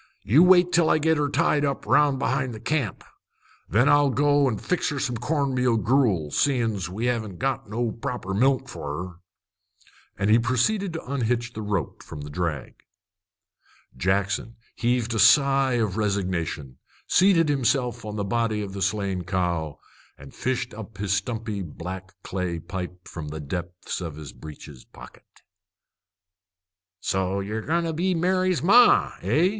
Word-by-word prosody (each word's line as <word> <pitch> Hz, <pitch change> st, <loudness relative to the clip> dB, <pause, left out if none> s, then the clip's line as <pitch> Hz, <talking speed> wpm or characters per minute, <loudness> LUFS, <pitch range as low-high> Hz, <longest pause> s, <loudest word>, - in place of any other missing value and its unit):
You 135 Hz, -, +5 dB
wait 180 Hz, 0 st, +6 dB
till 170 Hz, -2 st, +3 dB
I -, -, +4 dB
git 160 Hz, +1 st, +2 dB
her 145 Hz, -1 st, +1 dB
tied 145 Hz, +1 st, +2 dB
up 140 Hz, -2 st, -2 dB
'round 145 Hz, -2 st, +3 dB
behind 130 Hz, -2 st, -1 dB
the -, -, -8 dB
camp. 135 Hz, -, -2 dB, 0.7 s
Then 120 Hz, +7 st, +3 dB
I'll 145 Hz, -1 st, +5 dB
go 145 Hz, +2 st, +3 dB
an' 110 Hz, -, -2 dB
fix 180 Hz, -, -1 dB
her 145 Hz, -, -3 dB
some 125 Hz, -3 st, -2 dB
corn 140 Hz, +2 st, -1 dB
meal 125 Hz, -2 st, +2 dB
gruel, 105 Hz, -, +1 dB
seein's 115 Hz, -, 0 dB
we 105 Hz, +6 st, -3 dB
haven't 110 Hz, -6 st, -2 dB
got 135 Hz, -3 st, -2 dB
no 115 Hz, +1 st, -1 dB
proper 120 Hz, -5 st, -5 dB
milk 130 Hz, +5 st, +2 dB
for 70 Hz, 0 st, -6 dB
her." 90 Hz, +3 st, -6 dB, 1.0 s
And 100 Hz, +2 st, +1 dB
he 115 Hz, -, +6 dB
proceeded 165 Hz, -, 0 dB
to 165 Hz, -, -6 dB
unhitch 120 Hz, -3 st, -1 dB
the 110 Hz, -, -6 dB
rope 100 Hz, -8 st, -3 dB
from 75 Hz, -, -9 dB
the 75 Hz, 0 st, -8 dB
drag. 80 Hz, -4 st, -3 dB, 1.2 s
Jackson 100 Hz, -, -1 dB, 0.2 s
heaved 120 Hz, -1 st, 0 dB
a 110 Hz, -, -1 dB
sigh 135 Hz, +4 st, +5 dB
of 110 Hz, -5 st, 0 dB
resignation, 90 Hz, -9 st, -2 dB, 0.3 s
seated 180 Hz, -3 st, +4 dB
himself 125 Hz, -4 st, 0 dB
on 105 Hz, -1 st, -6 dB
the 105 Hz, -, -2 dB
body 110 Hz, 0 st, 0 dB
of 95 Hz, -1 st, -7 dB
the 100 Hz, -, -6 dB
slain 100 Hz, -3 st, -1 dB
cow, 85 Hz, -5 st, -2 dB, 0.4 s
and 70 Hz, 0 st, -13 dB
fished 125 Hz, -1 st, -2 dB
up 110 Hz, -1 st, -9 dB
his 100 Hz, 0 st, -1 dB
stumpy 110 Hz, -2 st, -2 dB
black 95 Hz, +2 st, -7 dB
clay 90 Hz, -2 st, -3 dB
pipe 90 Hz, +1 st, -7 dB
from 80 Hz, -3 st, -7 dB
the 75 Hz, +1 st, -6 dB
depths 90 Hz, +5 st, -5 dB
of 80 Hz, -4 st, -5 dB
his 75 Hz, -5 st, -9 dB
breeches 75 Hz, -3 st, -11 dB
pocket. -, -, -16 dB, 1.6 s
"So 95 Hz, +1 st, -1 dB
ye're 105 Hz, +3 st, -3 dB
goin' 170 Hz, +7 st, 0 dB
to 165 Hz, -1 st, -2 dB
be 180 Hz, +3 st, 0 dB
Mary's 185 Hz, +1 st, +1 dB
ma, 240 Hz, +7 st, +6 dB
eh?" 170 Hz, +5 st, +2 dB
115 Hz, 160 wpm, -25 LUFS, 95-140 Hz, 1.6 s, wait